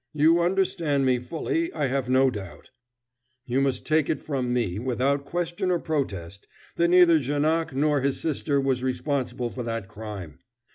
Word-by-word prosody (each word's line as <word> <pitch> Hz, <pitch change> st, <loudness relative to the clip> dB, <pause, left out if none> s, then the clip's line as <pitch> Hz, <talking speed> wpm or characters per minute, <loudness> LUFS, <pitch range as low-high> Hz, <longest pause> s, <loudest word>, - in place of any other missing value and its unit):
You 160 Hz, +3 st, +4 dB
understand 170 Hz, -6 st, +1 dB
me 130 Hz, -1 st, +2 dB
fully, 170 Hz, -, -2 dB
I -, -, -1 dB
have 130 Hz, -1 st, -1 dB
no 130 Hz, 0 st, +4 dB
doubt. 95 Hz, -9 st, -9 dB, 0.7 s
You 130 Hz, +2 st, 0 dB
must 135 Hz, -1 st, 0 dB
take 155 Hz, -1 st, +2 dB
it -, -, 0 dB
from 130 Hz, -5 st, -2 dB
me, 110 Hz, -6 st, -1 dB
without 130 Hz, +3 st, 0 dB
question 175 Hz, +3 st, -2 dB
or 180 Hz, -, +2 dB
protest, 100 Hz, -, -4 dB, 0.3 s
that 170 Hz, -, +3 dB
neither 175 Hz, -2 st, +6 dB
Janoc 155 Hz, +4 st, 0 dB
nor 145 Hz, 0 st, +2 dB
his 140 Hz, 0 st, 0 dB
sister 145 Hz, -2 st, 0 dB
was 135 Hz, -2 st, 0 dB
responsible 130 Hz, -2 st, -2 dB
for 130 Hz, -, -6 dB
that 115 Hz, -4 st, -4 dB
crime. 100 Hz, -7 st, -8 dB
140 Hz, 160 wpm, -25 LUFS, 125-160 Hz, 0.7 s, neither